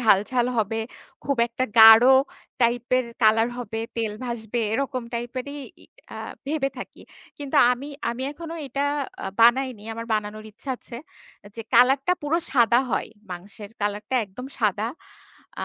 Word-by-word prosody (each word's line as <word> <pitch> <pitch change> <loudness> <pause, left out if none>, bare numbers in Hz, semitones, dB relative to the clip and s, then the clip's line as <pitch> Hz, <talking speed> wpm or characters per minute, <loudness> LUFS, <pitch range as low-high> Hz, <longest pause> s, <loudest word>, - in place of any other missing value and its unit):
ঝাল, 215 -5 +5
ঝাল 245 -1 +1
হবে। 225 +1 0 0.4
খুব 280 -1 0
একটা 240 +2 -2
গাঢ় 225 +3 +10 0.5
টাইপের 245 +1 +2 0.2
কালার 225 +2 +4
হবে, 225 -2 -5 0.2
তেল 225 -2 -1
ভাসবে। 235 -1 -3
এরকম 260 0 -2
টাইপেরই 255 +4 -5 0.6
আ - - -7 0.3
ভেবে 285 -1 0
থাকি। - - -9 0.4
কিন্তু 285 -2 -3 0.2
আমি 270 +4 -6 0.2
আমি 245 +2 -5
এখনো 330 +2 -8
এটা 275 +2 -2 0.6
বানাইনি। 240 -1 +3
আমার 230 0 -6
বানানোর 215 0 -4
ইচ্ছা 250 +6 -8
আছে 235 - -11 0.6
যে 225 - -5
কালার 260 +3 +6
টা 360 - +4
পুরো 310 +4 +1
সাদা 235 -2 +4
হয়। - - -1 0.2
মাংসের 200 +3 -8
কালার 205 +1 -2
টা - - 0
একদম 210 +6 -10
সাদা। 210 0 +1 0.8
আ - - -1
235 Hz, 145 wpm, -24 LUFS, 220-260 Hz, 0.8 s, গাঢ়